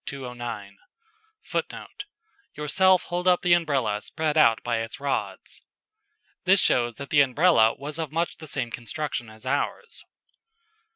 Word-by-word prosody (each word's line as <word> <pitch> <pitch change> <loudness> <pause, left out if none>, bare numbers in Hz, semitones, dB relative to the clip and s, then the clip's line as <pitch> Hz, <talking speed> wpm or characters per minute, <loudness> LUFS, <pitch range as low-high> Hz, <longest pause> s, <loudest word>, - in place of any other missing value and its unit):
[Footnote: - - -5 0.5
"Yourself 185 +5 +3
hold 180 +1 -3
up 180 0 +4
the 175 -1 +4
umbrella 135 -11 +1
spread 155 +2 -2
out 115 -8 +4
by 120 -1 -1
its 115 +2 -6
rods"] 140 0 -4 0.8
This 190 +1 +5
shows 120 -7 +3
that 140 +3 -9
the 145 - +6
Umbrella 135 -4 +4
was 150 +3 -6
of 160 -4 -3
much 165 +2 -2
the 155 - -11
same 130 -5 -3
construction 125 0 -4
as 110 +3 -14
ours. 140 +2 -3
145 Hz, 130 wpm, -25 LUFS, 120-170 Hz, 0.8 s, the